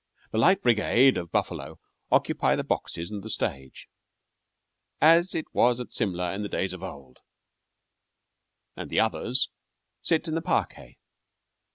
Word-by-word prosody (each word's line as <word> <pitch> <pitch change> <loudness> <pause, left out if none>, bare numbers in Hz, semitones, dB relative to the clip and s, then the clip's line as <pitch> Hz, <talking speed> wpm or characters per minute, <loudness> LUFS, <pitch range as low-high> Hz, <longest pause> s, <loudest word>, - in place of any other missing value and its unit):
The 110 - 0
"Light 190 - +4
Brigade" 120 +3 +4
of 85 -2 -5
Buffalo - - -2 0.3
occupy - - +2
the - - -2
boxes 85 +4 -3
and 105 -2 -5
the 110 - -8
stage, 65 -9 -4 1.1
"as 165 +3 +5
it 160 - -2
was 120 0 +3
at 125 - -7
Simla 90 -5 -1
in 100 - -4
the 105 - -4
days 95 - -2
of 95 - -9
old," 70 -9 -10 1.6
and - - -7
the - - +1
others 120 +3 +1 0.5
sit 165 0 0
in 160 - -3
the 165 - -1
parquet. - - -2
110 Hz, 145 wpm, -26 LUFS, 90-135 Hz, 1.6 s, as